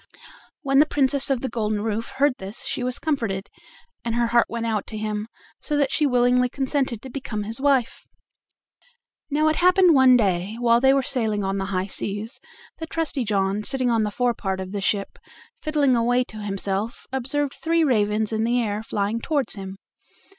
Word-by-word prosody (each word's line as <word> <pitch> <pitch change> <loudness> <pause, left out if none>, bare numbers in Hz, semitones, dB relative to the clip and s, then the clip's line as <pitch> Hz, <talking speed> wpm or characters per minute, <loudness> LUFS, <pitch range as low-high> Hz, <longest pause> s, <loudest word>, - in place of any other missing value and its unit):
When 275 0 +3
the 300 - +5
Princess 275 -1 +2
of 265 -3 0
the 265 - -2
Golden 215 -3 -2
Roof 225 +1 -3
heard 285 0 +3
this 195 +4 -6
she 250 - -2
was 250 -1 -2
comforted, 225 -11 -2 0.5
and 230 -1 -2
her 240 0 +2
heart 235 0 +3
went 230 0 -3
out 220 -3 -2
to 215 - -6
him, 215 0 -3 0.3
so 295 - -2
that 280 -2 +1
she 300 - +2
willingly 250 0 +3
consented 265 -4 -2
to 265 - -8
become 230 -6 -4
his 225 +5 -6
wife. 275 -4 +1 1.2
Now 305 +2 +2
it 310 - +1
happened 365 -1 +5
one 260 -2 +6
day, 195 -1 0
while 235 -1 +3
they 265 0 +5
were 275 0 +2
sailing 220 -6 +1
on 195 0 -1
the 195 - -2
high 190 -1 -1
seas, 205 +4 -3 0.4
that 320 0 -6
Trusty 315 -5 -1
John, 200 -1 0
sitting 255 0 +1
on 225 -1 +2
the 210 - 0
forepart 210 -4 -1
of 190 0 -6
the 200 -1 -3
ship, 200 0 -1 0.4
fiddling 290 -4 +2
away 245 +2 +2
to 220 - -9
himself, 200 +1 -3
observed 270 +2 -1
three 330 0 +1
ravens 215 -5 +1
in 220 0 0
the 240 +2 +1
air 210 -2 -1
flying 215 +1 -2
toward 285 -1 -1
him. 195 -1 -7
235 Hz, 190 wpm, -23 LUFS, 210-270 Hz, 1.2 s, one